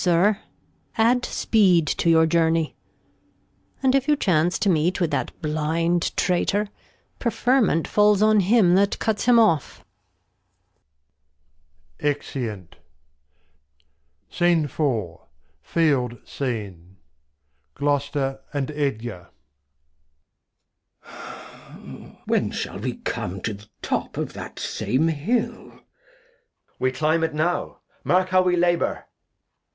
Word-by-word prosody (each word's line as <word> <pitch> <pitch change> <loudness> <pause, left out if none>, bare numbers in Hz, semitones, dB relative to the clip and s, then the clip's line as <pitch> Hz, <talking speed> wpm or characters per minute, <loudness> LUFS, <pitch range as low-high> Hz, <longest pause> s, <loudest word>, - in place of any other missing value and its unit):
Sir, 185 +4 +3 0.6
add 240 +3 +3
Speed 185 -7 +3
to 170 - 0
your 160 0 +5
Journey, 165 -1 +1 1.1
And 260 -1 +4
if 275 0 +1
you 300 - +4
chance 175 - +1
to - - -1
meet 175 +1 +2
with 170 -3 0
that 140 - -1
blind 160 +3 0
Traitor, 200 +3 +1 0.5
Preferment 240 -7 +1
falls 210 -1 +3
on 215 0 +5
him 195 -2 +4
that 200 +2 +2
cuts 220 -2 -1
him 245 -1 +5
off. 160 - +2 2.1
[Exeunt. 120 - -4 1.5
The 145 - 0 0.4
Field 135 -8 0
SCENE, 100 -9 -5 0.8
Gloster 140 -1 -1
and 140 0 -2
Edgar. 120 - -3 1.7
Glost. - - -12
When - - +1
shall - - -5
we - - -3
come 95 +2 -4
to 110 - -3
th' 105 +1 -13
Top - - -2
of - - -3
that - - -9
same 155 +6 0
Hill? 185 +11 -2
Edg. - - -20 1.0
We 130 - +1
cUmb 155 +4 +1
it 160 -2 -1
now, 170 +3 -1 0.2
mark 185 +1 +2
how 185 0 +4
we 180 -1 +2
labour. 175 0 0
165 Hz, 105 wpm, -23 LUFS, 140-190 Hz, 2.1 s, your